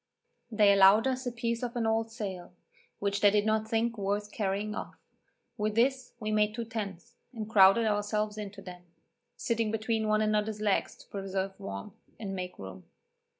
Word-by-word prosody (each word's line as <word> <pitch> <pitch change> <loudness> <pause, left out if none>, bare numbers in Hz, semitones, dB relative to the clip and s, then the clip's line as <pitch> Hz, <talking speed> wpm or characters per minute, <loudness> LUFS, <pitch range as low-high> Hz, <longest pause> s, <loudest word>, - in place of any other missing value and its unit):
They 210 -3 +5
allowed 200 +3 +6
us 260 -1 -1
a - - -1
piece 230 0 -2
of 245 -1 -4
an 235 -2 0
old 225 0 0
sail, 190 -6 -6 0.4
which 200 0 -1
they 205 - +7
did 205 0 +2
not 220 0 +1
think 230 0 0
worth 205 +1 -2
carrying 205 0 -2
off; - - -6 0.6
with 210 -1 -1
this 255 +2 +1
we 215 -2 -3
made 210 0 +2
two 235 0 -3
tents, 205 -6 -6 0.2
and 215 -2 -4
crowded 205 +1 +6
ourselves 210 0 0
into 205 -2 -7
them, 180 -1 -9 0.6
sitting 230 -2 0
between 220 0 -1
one 215 0 +2
another's 215 0 0
legs 210 -2 0
to - - -18
preserve 195 -1 -3
warmth, 100 - -7 0.3
and 195 -3 -4
make 180 -1 -5
room. 95 -1 -9
210 Hz, 175 wpm, -30 LUFS, 200-225 Hz, 0.6 s, they